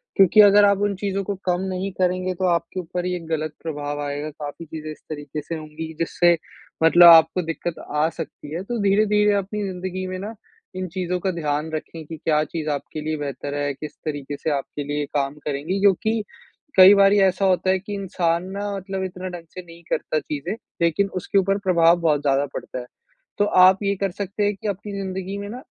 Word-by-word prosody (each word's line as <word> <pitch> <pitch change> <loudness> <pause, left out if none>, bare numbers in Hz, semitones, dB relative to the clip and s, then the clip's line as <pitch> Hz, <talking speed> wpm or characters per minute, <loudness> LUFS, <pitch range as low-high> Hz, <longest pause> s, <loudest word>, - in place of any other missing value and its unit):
क्योंकि 195 +2 +7
अगर 205 0 +7
आप 200 -1 +4
उन 200 - -3
चीज़ों 195 0 -2
को 200 +1 -3
कम 180 0 +1
नहीं 185 +1 -3
करेंगे 185 0 +1
तो 185 +1 -1
आपके 170 +1 0
ऊपर 180 0 -4
ही 180 - -1
एक 165 -2 -7
गलत 155 -1 -2
प्रभाव 145 -2 -4
आएगा। 145 +1 -3
काफ़ी 150 +2 -8
चीज़ें 155 0 -7
इस 155 - -12
तरीके 145 -1 -5
से 165 +3 -5
होंगी 155 0 -7
कि 160 - -9
जिससे 170 +1 +3 0.5
मतलब 175 +2 +8
आपको 165 +1 +7
दिक्कत 165 0 -4 0.2
आ 150 +1 +3
सकती 155 -2 -8
है। 170 +3 -3
तो 235 +3 -3
धीरे-धीरे 210 +1 +3
अपनी 200 +1 -2
ज़िंदगी 185 0 -4
में 185 0 -4
ना 210 +4 -6 0.4
इन 185 0 -3
चीज़ों 180 0 -1
का 190 +1 -1
ध्यान 155 -2 -2
रखें 160 +1 -6
कि 160 +2 -8
क्या 155 0 +1
चीज़ 155 0 -4
आपके 150 +1 -4
लिए 155 +1 -2
बेहतर 145 0 -5
है 145 0 -1
किस 150 +2 -9
तरीके 145 -2 -4
से 160 - -2
आपके 140 +2 -6
लिए 145 +1 -2
काम 140 -1 0
करेंगी? 150 +7 -2
क्योंकि 210 +3 +2 0.5
कई 190 +1 +10
बारी 200 0 +5
ऐसा 190 0 +2
होता 185 0 +2
है 190 0 +3
कि 205 +2 -8
इंसान 175 -4 -1
ना 200 +1 -4
मतलब 190 0 -4
इतना 185 0 -5
ढ़ंग 175 -2 -8
से 185 - -6
नहीं 170 -1 -15
करता 155 - 0
चीज़ें 150 +5 -4 0.3
लेकिन 170 +4 +2
उसके 200 - -1
ऊपर 195 +1 +2
प्रभाव 175 -3 +4
बहुत 150 -3 +2
ज़्यादा 140 -1 +2
पड़ता 130 - -6
है। 125 - -7 0.5
तो 205 - +3 0.2
आप 185 +1 +7
ये 200 0 +1
कर 195 -2 0
सकते 200 +2 -3
है 205 - +1
कि 200 +2 -7
अपनी 205 +1 -4
ज़िंदगी 190 0 -4
में 200 - -6
ना 245 +4 -7
175 Hz, 210 wpm, -23 LUFS, 155-195 Hz, 0.5 s, कई